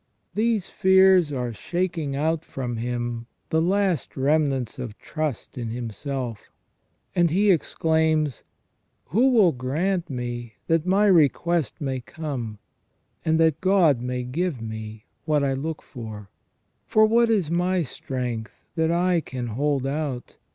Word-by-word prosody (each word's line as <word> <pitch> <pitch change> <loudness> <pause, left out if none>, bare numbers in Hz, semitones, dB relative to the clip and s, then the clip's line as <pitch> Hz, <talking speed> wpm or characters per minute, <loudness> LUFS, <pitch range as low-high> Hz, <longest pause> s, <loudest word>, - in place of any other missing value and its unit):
These 215 -3 +1
fears 190 -4 +5
are 125 -4 -2
shaking 170 - -2
out 160 +2 0
from 125 -3 -4
him 120 0 -3 0.2
the 160 - +3
last 185 -3 0
remnants 135 -4 +1
of 115 -4 -6
trust 155 -6 -4
in 115 -2 -3
him 115 0 -4
self, 125 -1 -5 0.7
and 175 -2 +4
he 200 +5 +4
exclaims: 160 -3 +1 0.7
"Who 235 - +4
will 215 -9 +5
grant 165 +8 -1
me 120 -3 -4
that 165 +1 +1
my 195 +3 +4
request 170 - +3
may 135 -3 -2
come: 125 -7 -5 0.7
and 160 0 +2
that 160 -2 +3
God 180 -9 +4
may 125 0 -2
give 150 +3 -2
me 110 -1 -7 0.2
what 150 -2 +2
I 135 -1 +1
look 155 +4 -4
for.... 110 -6 -9 0.6
For 215 0 +5
what 230 +2 +4
is 195 -8 +1
my 180 +1 +1
strength 125 -4 -5
that 160 -1 +1
I 175 0 +2
can 125 -2 -5
hold 140 +3 0
out 135 -3 -3
150 Hz, 135 wpm, -24 LUFS, 125-175 Hz, 0.7 s, fears